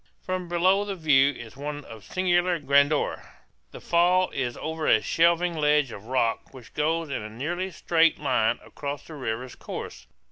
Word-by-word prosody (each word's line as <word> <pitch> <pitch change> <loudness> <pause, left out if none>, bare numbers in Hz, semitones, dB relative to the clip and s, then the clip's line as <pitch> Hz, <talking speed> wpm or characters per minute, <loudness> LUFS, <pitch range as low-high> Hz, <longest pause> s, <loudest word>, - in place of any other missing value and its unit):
From 185 -1 -4
below 185 +3 +3
the 200 -1 -4
view 145 -5 +4
is 115 -2 -10
one 145 +1 -6
of 110 -3 -11
singular 180 -1 +1
grandeur. 140 0 +2 0.5
The - - -11
fall 180 +2 +2
is 125 -3 -3
over 160 0 -4
a 110 - +5
shelving 170 +5 +2
ledge 150 -3 +2
of 100 - -10
rock 125 +1 -1
which 125 -3 -13
goes 160 +1 0
in 130 - -2
a 105 - -7
nearly 170 - -3
straight 165 -2 +2
line 120 -5 +1
across 145 0 -6
the 160 - -11
river's 125 -3 -4
course. - - -8
150 Hz, 170 wpm, -26 LUFS, 130-175 Hz, 0.5 s, a